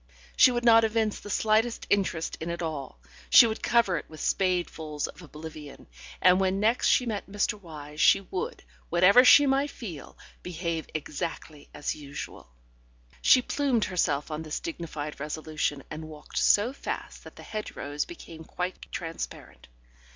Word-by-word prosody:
She - - +7
would 240 -1 -2
not 225 -1 +7
evince 220 -1 0
the 205 - -10
slightest 220 +3 +1
interest 190 -5 0
in 165 - -4
it 170 0 -4
all; 150 -5 -5 0.3
she 240 - +9
would 220 -1 -3
cover 235 -6 +2
it - - -8
with 155 - -11
spadefuls 165 -6 -1
of 165 - -12
oblivion, 155 -2 -10 0.3
and 180 0 +5
when 190 0 +1
next 225 +4 +2
she 250 - +4
met 210 -4 -4
Mr. 205 +1 0
Wyse 155 -7 -11
she 150 +4 +6
would, 185 -1 -5 0.3
whatever 185 +8 +6
she 290 +3 +8
might 275 +1 +2
feel, 175 - -9 0.2
behave 170 -2 -4
exactly 155 -1 -5
as - - -3
usual. 145 - -9 0.7
She 255 - +6
plumed 265 -6 0
herself 155 -5 -1
on 155 +1 -3
this 155 -1 -4
dignified 155 - -6
resolution, 155 -1 -3
and 155 +1 -7
walked 150 -1 -6
so 215 +6 +3
fast - - -6
that - - -13
the - - -12
hedge 215 -1 -6
rows 145 +1 -3
became 165 - -11
quite 180 +3 -6
transparent. 165 - -7
175 Hz, 160 wpm, -27 LUFS, 155-215 Hz, 0.7 s, she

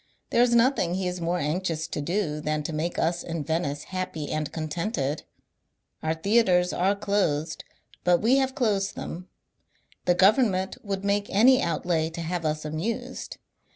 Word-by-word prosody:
There 235 - +4
is 240 -1 +4
nothing 235 -8 +3
he 190 -1 -1
is 180 0 -3
more 170 +2 0
anxious 160 0 -1
to 150 - -3
do 165 -1 -1
than 150 0 -1
to 160 - -4
make 160 +3 -2
us 170 +1 +1
in 165 -3 -4
Venice 150 -2 -2
happy 185 -5 -4
and 155 -1 -2
contented. 155 - -2 0.8
Our 160 +1 0
theatres 180 -1 +3
are 190 +3 +2
closed, 195 -7 0 0.4
but 175 -1 +4
we 240 +5 +4
have 265 -1 +1
closed 205 -8 0
them; 180 +2 -6 0.8
the 175 - +4
government 195 -1 +3
would 200 -1 -3
make 205 0 +1
any 250 +6 +5
out 170 - -1
lay 160 -2 +1
to 165 +1 -6
have 170 0 -3
us 155 0 -1
amused. 160 +10 -4
180 Hz, 165 wpm, -26 LUFS, 160-200 Hz, 0.8 s, any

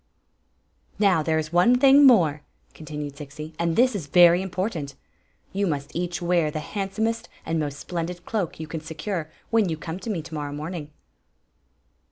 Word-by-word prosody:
" - - -45 0.3
Now, 195 -6 +3
there 160 +1 +1
is 155 +1 -3
one 210 +9 +5
thing 275 +1 +7
more," 165 - +4 0.3
continued 150 -2 -7
Zixi; 150 +2 -8
"and 170 -1 0
this 250 -1 +4
is 165 -8 -4
very 175 +3 +6
important. 185 -6 -3 0.6
You 200 +1 0
must 145 -4 -3
each 175 0 -2
wear 170 -3 +2
the 155 - -4
handsomest 215 +6 -3 0.2
and 165 0 -1
most 145 -2 -3
splendid 175 +2 -5
cloak 200 -9 -2
you 160 - -4
can 160 0 -6
secure 160 +1 -4 0.2
when 225 -5 +3
you 160 - -2
come 160 +3 -6
to 210 - -7
me 175 -7 -2
to 165 - -11
morrow 145 -2 -4
morning." 155 +1 -5
170 Hz, 175 wpm, -25 LUFS, 155-195 Hz, 0.6 s, thing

